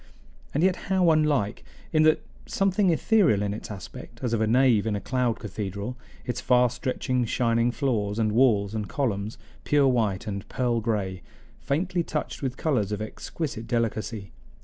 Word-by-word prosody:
And 150 - 0
yet 185 -1 +4
how 185 -3 +4
unlike 150 -9 +1 0.3
in 155 - +4
that 155 - 0 0.2
something 195 0 +2
ethereal 165 - +3
in 100 0 -1
its 105 - -7
aspect, 105 +3 -9
as 120 -2 0
of 115 - +1
a 110 - +2
nave 120 -2 +4
in 105 - 0
a - - -1
cloud 125 +2 0
cathedral, 100 +3 -5 0.3
its 125 - -3
far 125 -1 +4
stretching 125 0 -1
shining 115 0 +1
floors 115 -6 -1
and 110 -2 +1
walls 105 -4 +3
and 105 -3 -3
columns, 110 -6 -2 0.3
pure 145 -2 +3
white 110 -7 +1
and 100 -2 -5
pearl 120 -2 0
gray, 100 -5 -2 0.4
faintly 175 +5 0
touched 155 -2 -4
with 130 -1 -3
colors 125 -11 0
of 105 - -2
exquisite 115 +2 -5
delicacy. 115 -3 -2
120 Hz, 165 wpm, -26 LUFS, 105-140 Hz, 0.4 s, yet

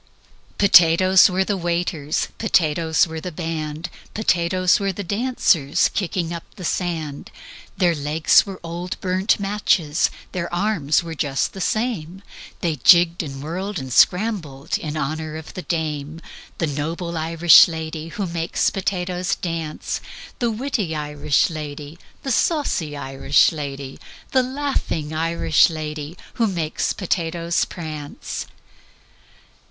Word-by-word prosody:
"Potatoes 185 0 +6
were 190 +1 +1
the 200 +1 -1
waiters, 170 -3 -1
Potatoes 160 -6 +2
were 160 -1 -6
the 180 - -5
band, 160 -1 -4 0.3
Potatoes 185 -2 +2
were 195 -1 0
the 200 +2 -6
dancers 200 - +2
Kicking 175 -3 -2
up 170 - -5
the 180 - -7
sand: 160 -5 -3 0.5
Their 175 -2 +3
legs 150 +1 +3
were 195 -2 -8
old 170 +2 -5
burnt 185 +3 +1
matches, 195 -6 +1 0.2
Their 175 -2 -4
arms 175 -5 +1
were 165 -1 -6
just 145 -3 -1
the 190 - -7
same, 195 -4 -2 0.4
They 165 -4 -1
jigged 170 +5 +5
and 135 -4 -7
whirled 185 +6 -4
and 130 -4 -5
scrambled 180 - +2
In 155 -1 -4
honor 155 +2 -3
of 160 - -10
the 185 - -5
dame: 155 -2 -3 0.4
The 165 - 0
noble 165 +4 -3
Irish 165 +1 +6
lady 160 -1 -5
Who 195 +4 -4
makes 170 -1 0
potatoes 180 -1 -2
dance, 165 -3 -4 0.4
The 240 - +1
witty 225 - -2
Irish 150 -1 0
lady, 150 0 -7 0.2
The 270 - -2
saucy 220 - 0
Irish 135 -1 +2
lady, 140 -3 -6 0.3
The 260 - +4
laughing 255 - -2
Irish 165 +3 +3
lady 155 0 -6 0.2
Who 230 - +1
makes 170 -6 -1
potatoes 170 -1 -1
prance. 155 -4 -6
170 Hz, 125 wpm, -22 LUFS, 155-185 Hz, 0.5 s, Potatoes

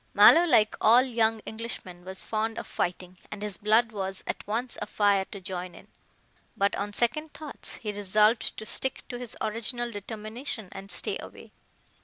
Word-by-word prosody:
Mallow, 340 +2 +8
like 215 -10 +4
all 240 +3 +7
young 225 -3 +1
Englishmen, 220 -6 -7
was 190 +1 -4
fond 220 +1 -2
of - - -4
fighting, 180 0 -3
and 210 0 -7
his 205 -4 -2
blood 220 +2 +3
was 195 -2 -4
at - - -4
once 235 +4 -2
afire 205 -2 +2
to 200 - -9
join 180 -1 -6
in, - - -15 0.7
but, 200 0 +2
on 205 +1 -3
second 270 +8 0
thoughts, 305 -2 -5
he 210 -3 -5
resolved 210 +3 +2
to 220 - -6
stick 265 +4 -1
to 245 -2 -5
his 245 -2 -5
original 235 +2 -1
determination 215 +1 -5
and 195 0 -9
stay - - +2
away. - - -11
215 Hz, 170 wpm, -28 LUFS, 200-235 Hz, 0.7 s, Mallow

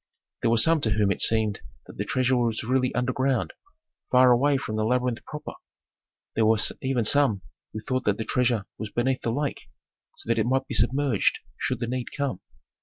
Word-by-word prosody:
There 115 - +1
were 115 - +3
some 160 +7 +4
to 110 - +1
whom 105 -2 +2
it - - -1
seemed 110 -2 +3 0.2
that - - -13
the - - -1
treasure 130 0 +1
was 120 -2 0
really 130 +2 +1
underground, 130 0 0 0.6
far 125 0 +5
away 140 +4 +3
from 110 -5 -5
the 110 - 0
labyrinth 125 +1 0
proper. 150 -1 -7 0.8
There 110 -1 +2
were 110 0 +4 0.2
even 130 -4 0
some 110 -7 +3 0.3
who 110 - -6
thought 130 +3 -2
that 105 -1 +1
the 110 - -4
treasure 120 -4 0
was 110 - -5
beneath 130 +3 -1
the 115 - -1
lake, 140 +3 -3 0.5
so - - -10
that 115 0 +1
it 110 - +1
might 130 +1 +1
be - - -7
submerged 125 -1 +1 0.2
should 130 - -2
the - - 0
need 125 +1 -3
come. 135 -10 -2
125 Hz, 195 wpm, -25 LUFS, 110-130 Hz, 0.8 s, far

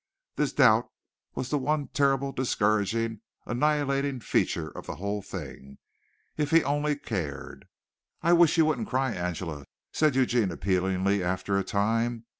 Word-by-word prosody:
This - - 0
doubt - - +4 0.5
was 130 - -3
the 145 - +1
one 145 +1 -1
terrible, 140 -1 +1
discouraging, 110 -2 0 0.2
annihilating 140 0 0
feature - - 0
of - - -9
the - - -5
whole 100 +2 -3
thing 70 -7 -9 0.6
if 150 -1 0
he 165 +1 +5
only 145 +2 0
cared. 85 - -5 0.6
"I 170 - +4
wish 170 -1 +5
you 160 - +5
wouldn't 140 -8 -1
cry, 130 0 0
Angela," 85 -5 -4 0.3
said 155 -4 +2
Eugene 120 -5 +2
appealingly, 95 +2 0
after 95 +2 -1
a 100 - +1
time. 115 +4 0
120 Hz, 140 wpm, -27 LUFS, 100-140 Hz, 0.6 s, he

